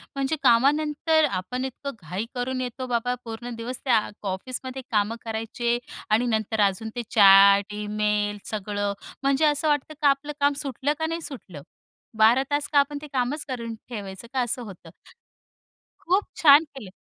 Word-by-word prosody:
म्हणजे 275 Hz, +3 st, 0 dB
कामानंतर 300 Hz, +5 st, +3 dB
आपण 250 Hz, +7 st, -3 dB
इतकं 270 Hz, +2 st, -6 dB
घाई 180 Hz, +6 st, -4 dB
करून 255 Hz, +1 st, -2 dB
येतो, 255 Hz, +1 st, -5 dB
बाबा 245 Hz, 0 st, 0 dB
पूर्ण 235 Hz, +1 st, -6 dB
दिवस 240 Hz, +3 st, -5 dB
त्या 240 Hz, -4 st, +4 dB, 0.3 s
ऑफिसमध्ये 255 Hz, +7 st, -5 dB
कामं 210 Hz, +1 st, +1 dB
करायचे. 225 Hz, +2 st, -2 dB, 0.3 s
आणि 220 Hz, +3 st, +3 dB
नंतर 220 Hz, -1 st, 0 dB
अजून 200 Hz, +3 st, -4 dB
ते 240 Hz, -, -2 dB
चॅट 200 Hz, 0 st, +7 dB
ईमेल 210 Hz, 0 st, -1 dB
सगळं, 205 Hz, -1 st, -2 dB, 0.3 s
म्हणजे 275 Hz, +2 st, +3 dB
असं 300 Hz, +1 st, +2 dB
वाटतं 295 Hz, 0 st, 0 dB
का 295 Hz, -, +4 dB
आपलं 275 Hz, +2 st, -1 dB
काम 285 Hz, 0 st, +3 dB
सुटलं 275 Hz, +1 st, -1 dB
का, 320 Hz, -, 0 dB
नाही 330 Hz, +1 st, -3 dB
सुटलं? 205 Hz, -, -8 dB, 0.6 s
12 225 Hz, +4 st, +5 dB
तास 290 Hz, 0 st, 0 dB
का 285 Hz, -, +6 dB
आपण 285 Hz, +1 st, 0 dB
ते 300 Hz, -, -8 dB
कामच 265 Hz, +4 st, -1 dB
करून 235 Hz, -4 st, -5 dB, 0.2 s
ठेवायचं 200 Hz, -2 st, -7 dB
का 260 Hz, -, +1 dB
असं 245 Hz, +1 st, -1 dB
होतं. 185 Hz, -6 st, -11 dB, 1.1 s
खूप 375 Hz, +4 st, +1 dB, 0.2 s
छान 295 Hz, 0 st, +8 dB
केले. 270 Hz, -10 st, -11 dB
245 Hz, 160 wpm, -25 LUFS, 210-280 Hz, 1.1 s, छान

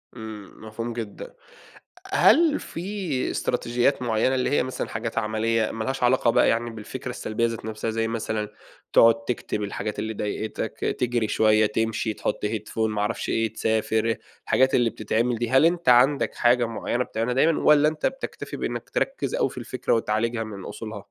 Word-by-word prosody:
إمم، 110 Hz, -1 st, -9 dB
مفهوم 115 Hz, +2 st, -5 dB
جدًا. 115 Hz, -3 st, -6 dB
أ -, -, -19 dB, 0.7 s
هل 320 Hz, -3 st, +5 dB
في 180 Hz, -6 st, -3 dB
إستراتيجيات 125 Hz, +2 st, 0 dB
معيّنة، 120 Hz, +2 st, +1 dB
اللي 130 Hz, -, 0 dB
هي 145 Hz, -, +2 dB
مثلًا 130 Hz, -, -4 dB
حاجات 115 Hz, 0 st, -5 dB
عملية 110 Hz, 0 st, 0 dB
ما 115 Hz, -, -4 dB
لهاش 130 Hz, +2 st, -2 dB
علاقة 120 Hz, -1 st, +4 dB
بقى -, -, +4 dB
يعني 115 Hz, +1 st, 0 dB
بالفكرة 110 Hz, -2 st, -7 dB
السلبية 110 Hz, +2 st, -2 dB
ذات 115 Hz, -1 st, -3 dB
نفْسها 110 Hz, +1 st, -3 dB
زي 115 Hz, 0 st, -1 dB
مثلًا: 110 Hz, -2 st, -3 dB, 0.4 s
تقعد 115 Hz, 0 st, +6 dB
تكتب 115 Hz, -3 st, -3 dB
الحاجات 105 Hz, +1 st, -4 dB
اللي 110 Hz, +1 st, -3 dB
ضايقتَك، 105 Hz, +1 st, -4 dB, 0.2 s
تجري 120 Hz, -3 st, 0 dB
شوية، 110 Hz, 0 st, +4 dB
تمشي، 110 Hz, +1 st, -1 dB
تحط -, -, -3 dB
Headphone، 105 Hz, 0 st, -4 dB
ما 105 Hz, -1 st, -2 dB
اعرفش 110 Hz, +3 st, -2 dB
إيه، 115 Hz, -1 st, 0 dB
تسافر- 110 Hz, 0 st, 0 dB, 0.4 s
الحاجات 130 Hz, 0 st, +3 dB
اللي 120 Hz, -2 st, +3 dB
بتتعمل 115 Hz, +3 st, 0 dB
دي- 120 Hz, 0 st, -2 dB
هل 135 Hz, +4 st, +6 dB
أنتَ 170 Hz, -3 st, +2 dB
عندَك 130 Hz, +4 st, +4 dB
حاجة 120 Hz, 0 st, +3 dB
معيّنة 120 Hz, +2 st, -2 dB
بتعملها 115 Hz, +1 st, -2 dB
دايمًا، 155 Hz, +5 st, +3 dB
والّا 150 Hz, 0 st, +5 dB
أنتَ 155 Hz, -1 st, -5 dB
بتكتفي 270 Hz, 0 st, -4 dB
بإنك -, -, -4 dB
تركّز -, -, -1 dB
أوي -, -, +1 dB
في -, -, -13 dB
الفكرة -, -, -2 dB
وتعالجها 115 Hz, +1 st, 0 dB
من 100 Hz, -4 st, -8 dB
أصولها؟ 110 Hz, -3 st, -7 dB
115 Hz, 170 wpm, -25 LUFS, 110-125 Hz, 0.7 s, تقعد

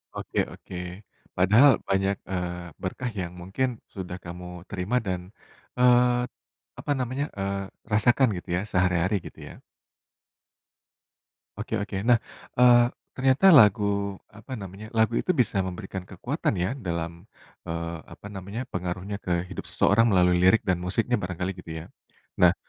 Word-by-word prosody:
Oke -, -, -3 dB
oke. -, -, -11 dB, 0.6 s
Padahal 110 Hz, +10 st, +7 dB, 0.2 s
banyak, 95 Hz, +1 st, +2 dB, 0.2 s
eee, 90 Hz, -2 st, -4 dB
berkah 120 Hz, +6 st, -3 dB
yang 90 Hz, 0 st, -5 dB
mungkin 100 Hz, +9 st, -1 dB, 0.3 s
sudah 90 Hz, -2 st, -6 dB
kamu 90 Hz, 0 st, -8 dB
terima 100 Hz, +5 st, -2 dB
dan, 90 Hz, -2 st, -2 dB, 0.6 s
eee, 125 Hz, 0 st, +5 dB, 0.5 s
apa 145 Hz, -, -3 dB
namanya, 130 Hz, +3 st, -1 dB
eee, 100 Hz, 0 st, -2 dB, 0.3 s
rasakan 120 Hz, +5 st, +4 dB
gitu 90 Hz, -, -9 dB
ya -, -, 0 dB
sehari-hari 90 Hz, +1 st, +2 dB
gitu -, -, -10 dB
ya. -, -, -13 dB, 2.0 s
Oke 105 Hz, +2 st, -5 dB
oke, 100 Hz, -1 st, -5 dB
nah 120 Hz, -2 st, +6 dB, 0.4 s
eee, 120 Hz, -1 st, +7 dB, 0.3 s
ternyata 135 Hz, +7 st, +3 dB
lagu, 100 Hz, -1 st, +3 dB, 0.2 s
apa 110 Hz, +4 st, -13 dB
namanya, 100 Hz, +3 st, -8 dB
lagu 110 Hz, +1 st, +3 dB
itu 185 Hz, -, +1 dB
bisa 100 Hz, -, -1 dB
memberikan 95 Hz, +1 st, -5 dB
kekuatan 125 Hz, -, -2 dB
ya 95 Hz, -, 0 dB, 0.2 s
dalam, 85 Hz, 0 st, -2 dB, 0.6 s
eee, 85 Hz, 0 st, -3 dB, 0.2 s
apa 105 Hz, -, -11 dB
namanya, 100 Hz, +6 st, -5 dB
pengaruhnya 90 Hz, +3 st, -3 dB
ke 90 Hz, -, -2 dB, 0.2 s
hidup 95 Hz, -, -6 dB
seseorang 115 Hz, +4 st, +3 dB
melalui 90 Hz, -1 st, +4 dB
lirik 100 Hz, +6 st, +6 dB
dan 90 Hz, -, +3 dB
musiknya 115 Hz, +6 st, +1 dB
barangkali 90 Hz, +1 st, -3 dB
gitu 85 Hz, -, -9 dB
ya. -, -, -10 dB, 0.5 s
Nah 90 Hz, -1 st, +7 dB
95 Hz, 140 wpm, -26 LUFS, 90-115 Hz, 2.0 s, Padahal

